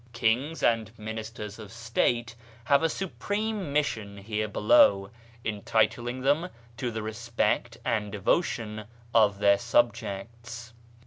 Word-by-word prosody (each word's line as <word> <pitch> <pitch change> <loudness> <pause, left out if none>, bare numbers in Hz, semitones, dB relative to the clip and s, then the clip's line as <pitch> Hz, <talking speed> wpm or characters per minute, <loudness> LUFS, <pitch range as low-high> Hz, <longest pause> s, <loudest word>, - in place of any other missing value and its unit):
Kings 125 +7 0
and 115 -2 +2
ministers 110 0 -6
of 105 -2 -10
State 115 0 0 0.3
have 140 +3 +4
a 165 - +2
supreme 205 +1 -3
mission 115 -9 -1
here 105 +1 -2
below, 100 -2 +4 0.3
entitling 115 +4 0
them 145 +7 +2 0.3
to 125 +1 -2
the 110 -2 -4
respect 115 +1 -1
and 105 -2 0
devotion 105 - -1 0.3
of 105 -3 +4
their 100 0 +4
subjects. 115 0 -1
115 Hz, 115 wpm, -28 LUFS, 105-120 Hz, 0.3 s, have